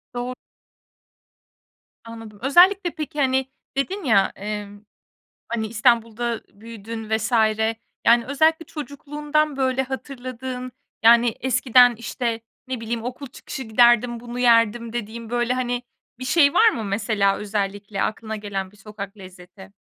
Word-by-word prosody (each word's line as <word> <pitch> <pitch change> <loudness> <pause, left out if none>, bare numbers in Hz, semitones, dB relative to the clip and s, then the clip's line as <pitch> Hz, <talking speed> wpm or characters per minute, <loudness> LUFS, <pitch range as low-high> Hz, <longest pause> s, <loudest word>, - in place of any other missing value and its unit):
Doğru. 250 +1 -3 1.7
Anladım. 225 -2 -11
Özellikle, 350 +6 +5
peki, 300 -2 -5
hani, 265 -1 +2 0.3
dedin 375 +7 -2
ya, 205 -7 +3
eee, 210 0 -4 0.8
hani, 220 -2 -2
İstanbul'da 230 0 +1
büyüdün 225 0 -8
vs. 220 +2 -1 0.7
Yani, 235 0 +5
özellikle 315 +4 +2
çocukluğundan, 295 0 -2
böyle, 265 0 +1
hatırladığın, 255 -1 -6 0.3
yani, 235 +1 +6
eskiden, 250 -1 +4
işte, 235 0 -3 0.3
ne 255 -2 -3
bileyim, 230 0 -4
"Okul 255 +3 -6
çıkışı 265 +1 -8
giderdim, 240 +1 +4
bunu 240 +1 -7
yerdim," 230 -1 +3
dediğin, 230 0 -5
böyle, 240 +1 0
hani, 245 -1 -2 0.4
bir 255 - -5
şey 285 0 +4
var 450 0 +6
mı, 230 - -4
mesela, 200 -1 +1
özellikle 200 -1 -3
aklına 220 0 -3
gelen 195 -2 -5
bir 210 - -21
sokak 205 0 -9
lezzeti? 185 +1 -13
235 Hz, 125 wpm, -23 LUFS, 215-260 Hz, 1.7 s, yani